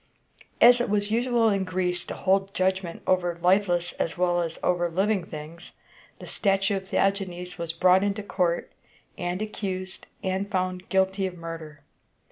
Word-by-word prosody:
As 245 +1 +7
it 245 - -1
was 205 0 0
usual 235 0 +2
in 200 -2 +1
Greece 180 -1 -1
to - - -6
hold 195 +1 +1
judgment 185 -2 -1
over 175 -2 +1
lifeless 180 -1 +2
as 165 - -1
well 175 -1 +2
as 165 -1 -3
over 175 -1 +1
living 195 +3 +1
things, 165 +1 -10 0.4
the - - -10
statue 195 0 +1
of 190 0 -8
Theagenes 180 -3 -1
was 170 -1 -2
brought 185 +3 +4
into 205 +1 -1
court, 175 -4 -1 0.4
and 180 +3 -2
accused 190 -3 -5 0.2
and 190 +1 -1
found 185 -1 -2
guilty 190 0 +1
of 180 -1 -8
murder. 165 -3 -8
185 Hz, 155 wpm, -26 LUFS, 175-195 Hz, 0.4 s, As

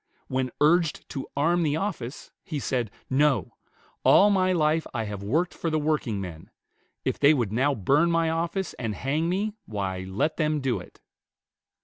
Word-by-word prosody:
When 130 0 -1
urged 160 +1 +2
to 135 - -5
arm 170 +5 +3
the 150 -3 +1
office, 160 - -4
he 155 - -4
said, 125 -5 -1 0.2
"No; 135 -2 +2 0.5
all 205 +1 +6
my 185 -2 +3
life 160 -2 +2
I 115 - 0
have 105 -2 -5
worked 155 - 0
for 165 - -3
the 155 - +1
workingmen; 110 - -2 0.6
if - - -1
they 145 +2 +6
would 120 -7 -1
now 135 +5 +2
burn 145 - +3
my 165 -1 +2
office 170 +3 -2
and 110 -4 -2
hang 150 - -1
me, 205 +4 -1
why, 95 -3 -3
let 105 +12 -1
them 155 -2 +1
do 130 -3 0
it." - - -14
150 Hz, 165 wpm, -26 LUFS, 120-165 Hz, 0.6 s, all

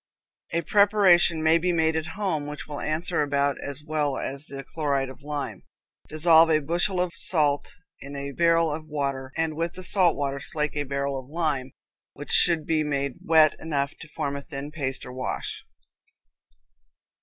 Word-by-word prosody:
A 170 0 -1
preparation 190 -4 +4
may 160 +1 +5
be 180 +2 0
made 160 -1 +1
at 160 +1 -2
home 170 -8 -1
which 150 0 -7
will 145 -1 -6
answer 160 +2 -1
about 140 -1 +1
as 145 +1 -5
well 150 -3 -1
as 140 +3 -4
the 135 0 -7
chloride 140 -2 -1
of 130 - -12
lime. 145 0 -5 0.5
Dissolve 160 +1 +5
a 155 - +4
bushel 175 +5 0
of 180 -1 -1
salt 150 -4 +1 0.3
in 140 +1 -9
a 140 0 -5
barrel 165 +1 +2
of 155 +1 -7
water, 140 -3 -3
and 160 -1 -1
with 165 +1 -2
the 185 - -7
salt 180 -2 +3
water 140 -1 -2
slake 150 +2 -2
a 145 -1 -1
barrel 140 0 -2
of 130 0 -13
lime, 150 -5 -1 0.4
which 145 - -8
should 165 -3 +5
be 155 -1 +1
made 140 -3 -2
wet 160 -2 +5
enough 140 -2 -2
to 165 - -10
form 150 -2 -4
a 140 - -5
thin 140 0 -7
paste 135 -4 -2
or 125 - -9
wash. 130 0 -4
150 Hz, 180 wpm, -25 LUFS, 140-165 Hz, 0.5 s, may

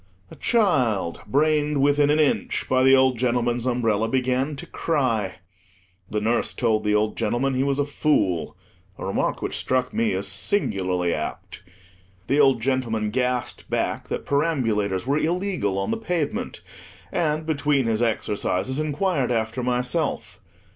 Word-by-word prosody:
A - - -10
child, 130 - +1
brained 150 +3 +2
within 145 +1 +3
an 150 +1 +3
inch 150 -3 +1
by 130 0 +2
the 135 +1 +6
old 130 -2 +3
gentleman's 120 0 0
umbrella, 115 -3 +1
began 130 +3 0
to 135 - -8
cry. 115 - -1 0.7
The 105 - -1
nurse 115 +3 +1
told 110 -3 +1
the 105 0 +2
old 105 +1 +1
gentleman 120 +4 0
he 130 - 0
was 140 0 0
a 145 - +1
fool—a 95 - -2
remark 95 - -1
which - - -2
struck 130 0 0
me 225 -1 +1
as - - -2
singularly 95 - 0
apt 75 - -5 0.6
The 140 +3 +1
old 135 -5 +4
gentleman 115 -5 0
gasped 125 0 -2
back - - -2
that - - -4
perambulators 115 - 0
were 140 +3 +1
illegal 175 - -1
on 95 - -1
the - - 0
pavement; 175 -9 -3 0.5
and, 155 -2 0
between 145 -4 +1
his 115 0 0
exercises, 115 +2 -1
inquired 155 -2 0
after 115 +1 -1
myself. 125 +5 -1
130 Hz, 145 wpm, -24 LUFS, 110-145 Hz, 0.7 s, the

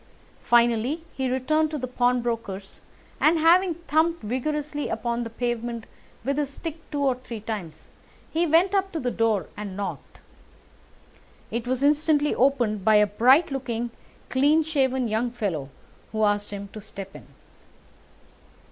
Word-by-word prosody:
Finally 240 +6 +2
he 265 -1 -1
returned 305 +5 +1
to 305 - -3
the 255 - -3
pawnbroker's, 235 -6 -1 0.4
and, 320 +2 +4
having 340 +2 +4
thumped 330 -1 0
vigorously 290 +6 -2
upon 235 +1 -2
the 230 - -5
pavement 235 0 -3 0.4
with 275 +2 0
his 290 -2 -1
stick 320 +3 -6
two 290 -2 -2
or 270 -2 +3
three 245 -2 -8
times, 205 -7 -6 0.4
he 335 +2 +1
went 340 +5 +4
up 390 -1 +1
to 330 - -3
the 250 -3 -1
door 225 -5 +1
and 200 -2 -6
knocked. 200 - -5 1.3
It 235 +1 -3
was 255 +1 -1
instantly 295 0 +3
opened 240 -7 +2
by 220 +1 +5
a 210 0 +6
bright 255 - +4
looking, 240 -3 -3 0.4
clean 290 +5 +4
shaven 265 -5 +1
young 220 +3 0
fellow, 195 - -3 0.4
who 220 0 0
asked 205 0 +1
him 200 -1 -6
to 215 - -9
step 195 -2 -9
in. - - -12
250 Hz, 145 wpm, -25 LUFS, 220-295 Hz, 1.3 s, a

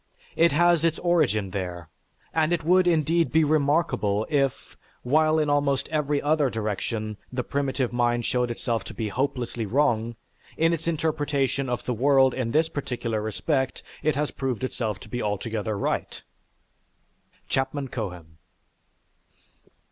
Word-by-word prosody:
It 170 0 +4
has 170 +2 +4
its 165 -1 +2
origin 140 - +1
there, 90 -3 -4 0.5
and 160 0 +2
it 170 -2 0
would 180 +2 +4
indeed 165 0 +2
be 160 0 +4
remarkable, 145 -8 +1
if, 135 -4 0 0.3
while 155 +4 +3
in 155 -1 +2
almost 145 -2 +1
every 150 -2 0
other 150 -1 +2
direction 110 -1 -3
the 125 -1 -2
primitive 135 -3 -1
mind 120 -1 +1
showed 125 -1 0
itself 115 -1 -2
to - - -8
be 110 -2 -2
hopelessly 120 -2 -2
wrong, 120 -2 +1 0.4
in 165 +1 +3
its 165 - -3
interpretation 145 -4 0
of 125 - -3
the 125 - 0
world 135 +1 +4
in 125 -3 -2
this 155 +6 +2
particular 120 -7 -3
respect, 130 +5 -1 0.2
it 155 -2 +1
has 150 +1 -1
proved 130 -3 -3
itself 110 -5 -2
to - - -11
be 120 - -4
altogether 105 0 -2
right." - - -2 1.2
(_Chapman 135 0 -1
Cohen. 90 -8 -6
135 Hz, 140 wpm, -25 LUFS, 115-155 Hz, 1.2 s, It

